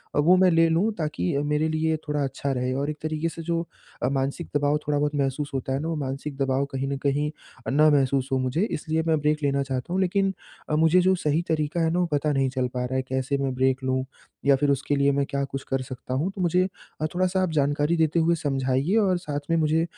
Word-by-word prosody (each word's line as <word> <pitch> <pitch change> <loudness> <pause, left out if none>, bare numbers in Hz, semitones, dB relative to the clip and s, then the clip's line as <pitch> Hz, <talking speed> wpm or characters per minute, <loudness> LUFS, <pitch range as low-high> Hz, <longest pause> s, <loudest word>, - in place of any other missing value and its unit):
अ, - - +2
वो 170 +5 +6
मैं 185 0 +5
ले 165 0 +5
लूँ 175 +7 +2
ताकि 150 - -1
अ, 140 - +1
मेरे 150 +1 +1
लिए 160 0 0
थोड़ा 150 -1 0
अच्छा 135 +1 -2
रहे। 125 -1 -1
और 140 +3 -1
एक 150 - -4
तरीके 155 +1 -1
से 165 - -8
जो 165 0 0 0.4
अ, 125 - +2
मानसिक 140 +4 -2
दबाव 145 +1 +2
थोड़ा 150 -1 +1
बहुत 150 +1 0
महसूस 140 +1 -1
होता 135 0 -2
है 135 - 0
ना, 155 - -3
वो 165 - -1
मानसिक 140 0 -4
दबाव 135 0 +1
कहीं 135 0 -2
न 140 0 -2
कहीं 145 +2 +1 0.4
अ, - - 0
ना 150 +3 +5
महसूस 135 -2 +2
हो 135 - +2
मुझे, 130 +6 0
इसलिए 160 +1 -1
मैं 160 -1 +3
ब्रेक 150 0 +1
लेना 140 -1 +1
चाहता 130 +5 -4
हूँ। 190 - +1
लेकिन 195 +1 +1 0.4
अ, 155 - +1
मुझे 160 +3 +4
जो 185 +1 +3
सही 150 +2 +2
तरीका 155 +1 0
है 165 - +2
ना 175 - +1
वो 180 - +2
पता 150 +1 +1
नहीं 135 -2 +1
चल 130 -1 -1
पा 125 0 -1
रहा 130 +1 -3
है, 130 - +2
कैसे 130 +2 -1
मैं 135 -1 -1
ब्रेक 130 +1 +1
लूँ 130 0 0 0.4
या 140 -1 +6
फिर 145 +2 +1
उसके 140 +1 0
लिए 140 0 +3
मैं 140 0 +1
क्या 140 0 -1
कुछ 135 0 -6
कर 135 0 0
सकता 130 -1 -7
हूँ, 155 +9 0
तो 195 - -4
मुझे 180 +1 +2 0.3
अ, - - +1
थोड़ा-सा 185 +1 +1
आप 180 - -1
जानकारी 145 +4 +1
देते 160 0 +2
हुए 165 +1 +3
समझाइए 135 +3 0
और 190 -4 +3
साथ 150 -5 -4
में 165 - +3
मुझे 160 +1 +2
145 Hz, 255 wpm, -25 LUFS, 135-160 Hz, 0.4 s, वो